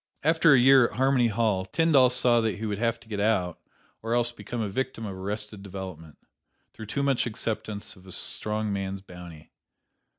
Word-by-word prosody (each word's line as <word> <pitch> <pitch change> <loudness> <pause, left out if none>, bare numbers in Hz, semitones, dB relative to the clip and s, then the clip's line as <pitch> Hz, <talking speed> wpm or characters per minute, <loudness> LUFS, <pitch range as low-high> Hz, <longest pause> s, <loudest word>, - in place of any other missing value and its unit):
After 160 0 +5
a - - +5
year 130 -1 +6
at - - -12
Harmony 130 -1 +3
Hall, 110 -3 0
Tyndall 135 - +3
saw 120 -1 +3
that 110 -1 -1
he 110 - -5
would 105 -2 -3
have 115 0 0
to - - -18
get 105 -2 -4
out 100 -5 0 0.4
or 115 +1 -1
else 120 0 +2
become 120 0 -7
a 110 - -1
victim 115 +2 -3
of 100 - -5
arrested 105 +2 -5
development, 95 -6 -9 0.6
through 110 - -9
too 140 +6 -2
much 135 -3 +1
acceptance 110 -2 -4
of 95 0 -18
a - - -10
strong 105 +2 -1
man's 95 0 -4
bounty. 90 -4 -12
110 Hz, 190 wpm, -26 LUFS, 95-120 Hz, 0.6 s, year